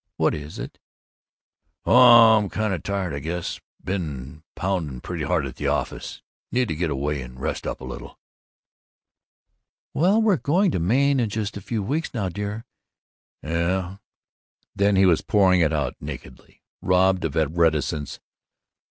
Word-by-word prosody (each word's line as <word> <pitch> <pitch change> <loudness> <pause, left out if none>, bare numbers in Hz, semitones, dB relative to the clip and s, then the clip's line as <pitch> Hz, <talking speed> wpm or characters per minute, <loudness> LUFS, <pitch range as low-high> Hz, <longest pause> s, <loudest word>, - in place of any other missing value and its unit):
What - - +2
is 75 +1 -7
it?" - - -8 1.1
"Oh, 120 -3 +8
I'm 100 -2 -3
kind 110 -2 -1
of 85 - -3
tired, 100 -4 -3
I 70 - -3
guess. 85 +3 -4 0.2
Been 75 -6 -5
pounding 85 -9 -2
pretty 85 +3 -5
hard 80 -3 0
at 65 - -8
the - - -2
office. - - -3 0.3
Need 125 -1 +1
to 80 - -2
get 85 +1 -1
away 70 0 -2
and 65 0 -10
rest - - -3
up - - -4
a - - -7
little." 65 - -9 1.8
"Well, 190 +8 +3
we're 215 -5 +3
going 175 +7 +2
to - - -1
Maine 135 +10 +2
in 115 -3 0
just 105 0 -3
a 100 - -6
few 110 +1 -3
weeks 150 +7 -3
now, 100 -5 -1
dear." 105 +4 -5 0.8
"Yuh 90 +4 -2 0.4
" - - -50
Then 100 0 +2
he 95 0 +5
was 85 -4 +4
pouring 95 -3 +3
it 80 -2 +2
out 75 -5 -1
nakedly, 65 -3 -10 0.2
robbed 95 0 +2
of 80 -1 -3 0.2
reticence. 80 -3 0
90 Hz, 160 wpm, -23 LUFS, 75-105 Hz, 1.8 s, Oh